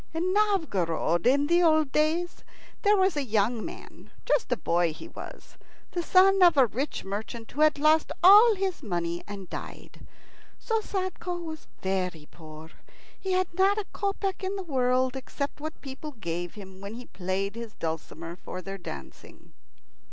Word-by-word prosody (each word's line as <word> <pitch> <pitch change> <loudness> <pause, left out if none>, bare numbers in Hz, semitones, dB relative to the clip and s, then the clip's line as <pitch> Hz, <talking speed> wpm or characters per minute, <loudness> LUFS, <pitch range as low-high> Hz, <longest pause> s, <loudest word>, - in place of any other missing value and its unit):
In 360 +3 0
Novgorod 205 - +1
in 280 +3 +4
the 345 +3 +3
old 315 -4 +4
days 320 +4 0 0.4
there 415 0 +4
was 380 -2 +3
a 290 - 0
young 220 -1 +1
man - - -10 0.2
just 450 - +1
a 245 - +2
boy 170 -3 +1
he - - -10
was - - -11 0.3
the 350 - -1
son 385 +2 +5
of 345 -4 +7
a 265 - +7
rich 260 +6 -3
merchant 220 +3 -6
who 295 - -3
had 310 -1 +5
lost 310 +2 +3
all 420 +5 +9
his 380 -3 -2
money 175 - -3
and 200 -2 -7
died. - - -9 0.5
So 450 -1 -1
Sadko 370 -3 -3
was 315 -1 -7 0.2
very 180 -5 -2
poor. 155 0 -12 0.5
He 380 -1 -2
had 370 -1 0
not 385 +3 +3
a 425 - -2
kopeck 395 -1 -2
in 380 +1 -2
the 390 - -4
world, 255 -4 +1
except 280 +2 -5
what 310 +1 -5
the - - -33
people 280 +2 -8
gave 175 -5 -5
him 190 -2 -11
when 200 +2 -7
he 245 +1 -9
played 190 +2 -3
his 230 -1 -8
dulcimer 165 +1 -5
for 185 - -7
their 195 +1 -6
dancing. 70 - -10
270 Hz, 170 wpm, -27 LUFS, -, 0.5 s, all